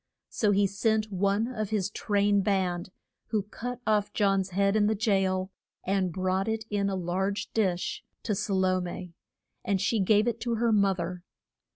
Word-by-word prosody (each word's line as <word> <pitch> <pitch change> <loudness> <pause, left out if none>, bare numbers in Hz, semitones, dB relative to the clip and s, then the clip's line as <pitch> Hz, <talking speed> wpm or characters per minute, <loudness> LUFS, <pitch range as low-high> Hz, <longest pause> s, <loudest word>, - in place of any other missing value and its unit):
So 215 - +1
he 200 0 +4
sent 215 +2 0
one 200 +4 +1
of 215 -5 -3
his 205 -2 -1
train 205 -1 +2
band, 185 -3 0 0.4
who 215 -3 0
cut 245 +4 -6
off 210 -2 +1
John's 195 -2 +2
head 195 +2 +1
in 210 -1 +4
the 220 - +2
jail, 195 -3 +1 0.3
and 190 -1 0
brought 185 +3 0
it 220 -1 -2
in 200 -1 +1
a 195 - -1
large 190 +3 -2
dish 185 -5 -1 0.2
to 215 - -1
Sa 200 - -2
lo 185 -1 +2
me, 180 0 -6 0.5
and 200 -4 0
she 220 +3 +1
gave 210 +3 +3
it 235 -1 -1
to 235 -1 -1
her 230 +1 +1
mo 200 -2 +3
ther. 175 0 -5
200 Hz, 180 wpm, -28 LUFS, 185-215 Hz, 0.5 s, he